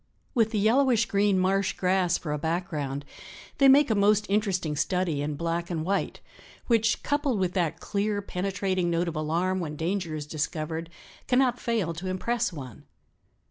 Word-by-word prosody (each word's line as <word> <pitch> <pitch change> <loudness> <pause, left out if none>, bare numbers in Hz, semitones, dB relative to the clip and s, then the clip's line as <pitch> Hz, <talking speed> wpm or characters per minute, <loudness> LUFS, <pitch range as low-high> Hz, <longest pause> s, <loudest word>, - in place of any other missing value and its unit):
With 225 -5 +3
the 220 - -2
yellowish 230 +2 +3
green 200 -1 +2
marsh 190 +1 +1
grass 180 -1 +1
for 150 -3 -4
a 150 - -2
background, 155 -4 -3 0.5
they 275 - +7
make 275 -1 +6
a - - +5
most 210 +1 +3
interesting 190 -7 0
study 170 -1 0
in 145 0 -2
black 170 +2 -2
and 160 -3 -2
white, 200 +2 -1 0.4
which, 230 -1 +2
coupled 285 -5 0
with 185 -2 0
that 175 -5 -1
clear 205 0 -1
penetrating 190 -2 -1
note 170 +1 0
of 165 - -3
alarm 170 +5 0
when 155 -4 -4
danger 170 0 -2
is 150 -1 -5
discovered, 155 +2 -3 0.4
cannot 250 -1 +2
fail 220 -8 -1
to 175 +4 -6
impress 185 +6 -1
one." 130 - -9
185 Hz, 165 wpm, -27 LUFS, 165-210 Hz, 0.5 s, they